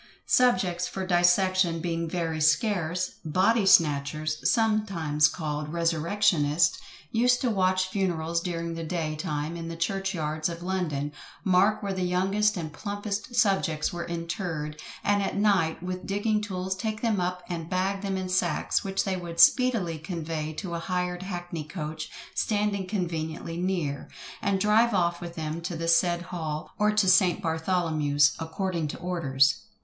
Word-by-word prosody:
Subjects 185 -8 +2
for 190 -1 -4
dissection 175 -1 +3
being 165 -1 -2
very 165 -2 -2
scarce, 175 +2 +1
"BODY 190 +6 +2
SNATCHERS," 155 -1 +3
sometimes 195 -10 +2
called 150 -2 -4
"resurrectionists" 165 -1 +2 0.3
used 245 +2 +3
to 250 - +1
watch 185 -2 +2
funerals 170 -4 -1
during 170 -1 -3
the 165 0 -5
day 160 -2 -2
time 155 -1 -3
in 165 -1 -6
the 165 - -5
church 195 +3 -1
yards 155 0 -1
of 170 0 -7
London, 160 -6 -2 0.3
mark 195 +3 +3
where 200 -1 -1
the 190 - -3
youngest 195 +3 +1
and 155 -3 -5
plumpest 205 +4 -4
subjects 195 -9 +1
were 170 0 -4
interred, 165 -3 -4 0.2
and 205 0 +2
at 195 - -2
night, 195 -6 +2
with 185 0 -5
digging 210 +2 0
tools 190 -2 -3
take 215 +2 -3
them 220 -4 +1
up 180 0 -2
and 170 -2 -5
bag 190 +2 0
them 195 -1 -2
in 185 0 -3
sacks, 185 -3 0
which 195 0 -1
they 190 -2 -1
would 170 -2 -6
speedily 225 -11 +4
convey 160 -2 -4
to 170 +2 -6
a 170 - -2
hired 180 0 -2
hackney 175 -4 -5
coach 155 -1 -6 0.2
standing 205 -3 0
conveniently 165 -4 -3
near, 170 -6 -2 0.3
and 200 -1 +1
drive 215 +2 +3
off 175 -1 +1
with 170 -1 -7
them 160 +1 -4
to 175 +1 -4
the 165 +1 -3
said 175 +1 +3
hall, 160 -4 -5
or 210 0 +4
to 210 -2 +2
St. 185 -1 +5
Bartholomew's, 160 -4 +2
according 165 0 -2
to - - -6
orders. 140 -6 +2
175 Hz, 155 wpm, -27 LUFS, 160-195 Hz, 0.3 s, St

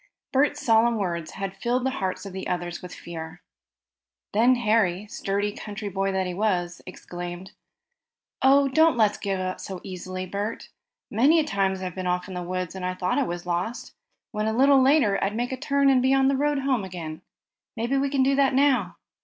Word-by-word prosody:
Bert's 290 +2 +2
solemn 230 0 +4
words 170 -5 -3
had 195 0 -5
filled 240 +5 -1
the 265 - +1
hearts 190 -5 -3
of 195 - -7
the 190 - -5
others 175 -1 -3
with 180 - -9
fear. 165 +1 -8 0.9
Then 235 +5 +5
Harry, 215 -5 +1
sturdy 205 0 -2
country 205 0 -6
boy 195 0 -1
that 190 0 0
he 180 - -3
was, 175 -3 -1
exclaimed: 175 0 -7 0.9
"Oh, 275 +1 +5
don't 315 +1 +4
let's 215 -2 +2
give 195 -2 -2
up 185 0 -3
so 190 -2 -6
easily, 185 0 -6
Bert. 200 +4 -4 0.4
Many 280 +10 +4
a - - +3
time 195 -8 0
I've 185 -2 -5
been 185 0 -4
off 180 0 -1
in 190 - -8
the 180 - -4
woods, 180 0 -3
and 190 -1 -7
thought 180 - 0
I - - +2
was 175 0 -5
lost, 180 +7 -3 0.4
when 215 0 -2
a 220 - 0
little 275 +1 +6
later, 260 -8 +3
I'd 200 +2 -1
make 245 +2 -2
a - - -1
turn 280 +1 +1
and 265 -2 +5
be 260 +1 +3
on 270 0 +4
the 275 - +2
road 290 +1 +1
home. 255 -8 0 0.9
Maybe 235 +4 0
we 275 +1 +1
can 270 -1 +2
do 275 +1 +3
that 275 -1 +3
now." 260 -10 +2
205 Hz, 195 wpm, -25 LUFS, 185-260 Hz, 0.9 s, little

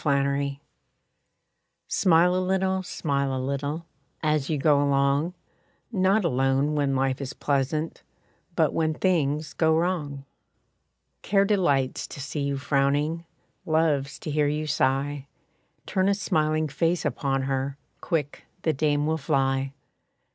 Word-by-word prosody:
=Smiles= 140 -1 +1 1.3
Smile 180 -1 +4
a - - +2
little, 190 0 +1
smile 140 -6 -1
a - - -2
little, 140 +5 -3 0.4
As 150 -3 +1
you 155 - +1
go 145 0 +3
along, 140 +4 +1 0.6
Not 195 0 +2
alone 135 0 +1
when 140 -2 +1
life 135 0 0
is 135 -1 -5
pleasant, 145 +3 -1 0.5
But - - +2
when 155 -1 0
things 155 -5 0
go 160 -1 +3
wrong. 155 -6 -2 1.0
Care 200 0 +3
delights 145 -11 +1
to - - -9
see 145 +1 -4
you 140 0 -1
frowning, 145 +4 0 0.4
Loves 155 -3 +1
to 155 - -4
hear 150 0 +2
you 150 +1 -1
sigh; 140 0 0 0.6
Turn 190 +1 +1
a 200 - +3
smiling 155 -5 0
face 165 +3 0
upon 135 -1 0
her, 135 +1 -2 0.2
Quick 150 -5 -2 0.2
the 160 - +2
dame 145 0 +1
will 160 +1 0
fly. 135 -1 0
145 Hz, 130 wpm, -26 LUFS, 140-165 Hz, 1.3 s, Smile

